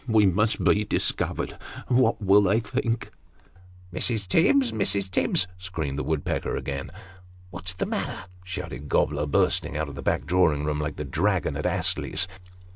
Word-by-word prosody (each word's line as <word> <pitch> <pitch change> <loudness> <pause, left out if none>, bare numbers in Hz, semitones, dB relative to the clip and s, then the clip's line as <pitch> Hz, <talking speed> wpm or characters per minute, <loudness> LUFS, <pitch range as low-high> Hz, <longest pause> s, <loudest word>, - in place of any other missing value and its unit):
We 110 -3 +4
must 105 +4 +2
be 105 - +4
discovered! 105 - -1 0.3
What 125 -2 +3
will 100 -1 +5
they 100 +3 +3
think? 115 -1 -2 0.3
" 90 - -27
" 90 0 -23
Mrs. 110 0 -1
Tibbs! 250 - +3
Mrs. 100 -2 0
Tibbs! 95 - +2
" - - -23
screamed 80 -7 -4
the - - -2
woodpecker 80 -2 -2
again. 70 0 -4 0.3
" 90 0 -23
What's 90 0 -5
the - - -1
matter? - - -3
" 90 0 -23
shouted 90 -5 -6
Gobler, 75 0 +1
bursting 70 - +1
out 80 -1 -2
of - - -8
the 70 - -7
back - - 0
drawing 80 -5 +2
room, 75 -1 -1
like 75 -1 -3
the - - -5
dragon - - 0
at - - -1
Astley's. 95 - +1
90 Hz, 180 wpm, -26 LUFS, 75-105 Hz, 0.3 s, will